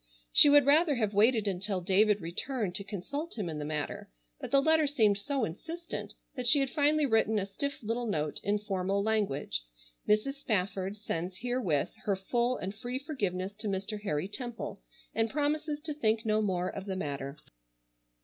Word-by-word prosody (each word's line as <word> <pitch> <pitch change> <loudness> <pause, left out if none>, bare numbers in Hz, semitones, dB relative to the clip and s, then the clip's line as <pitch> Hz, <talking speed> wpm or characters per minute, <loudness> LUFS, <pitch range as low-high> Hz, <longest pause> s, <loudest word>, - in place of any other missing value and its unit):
She 290 - +8
would 290 -1 +7
rather 300 +1 +5
have 215 -4 0
waited 220 +1 +4
until 195 0 -1
David 200 +3 +3
returned 190 +4 -3
to 200 - -3
consult 235 - -5
him 205 -5 -2
in 155 -2 -4
the - - -3
matter, 150 -1 -4 0.3
but - - -5
the 275 - +5
letter 315 +1 +4
seemed 215 -8 +3
so 275 +2 0
insistent 330 - -6 0.2
that 250 -2 -2
she 260 +4 +6
had 270 -2 0
finally 300 0 +3
written 220 -3 +2
a 195 - 0
stiff 280 +8 -4
little 230 +2 -1
note, 150 -7 -1
in 205 +1 +1
formal 200 -1 -1
language, 195 - 0 0.5
"Mrs. 245 +7 +2
Spafford 195 -3 -1
sends 185 -3 -3
herewith 245 - 0
her 200 - +2
full 240 +6 0
and 190 +1 -4
free 245 +4 -4
forgiveness 200 - -3
to 215 0 -4
Mr. 195 +2 -3
Harry 155 -4 -1
Temple, 240 +2 -6 0.3
and 225 0 +1
promises 295 +2 0
to 305 -1 -4
think 225 -5 +1
no 215 0 +2
more 185 -3 0
of 195 +1 -5
the 195 -2 -3
matter." 140 -4 -4
215 Hz, 180 wpm, -31 LUFS, 190-265 Hz, 0.5 s, She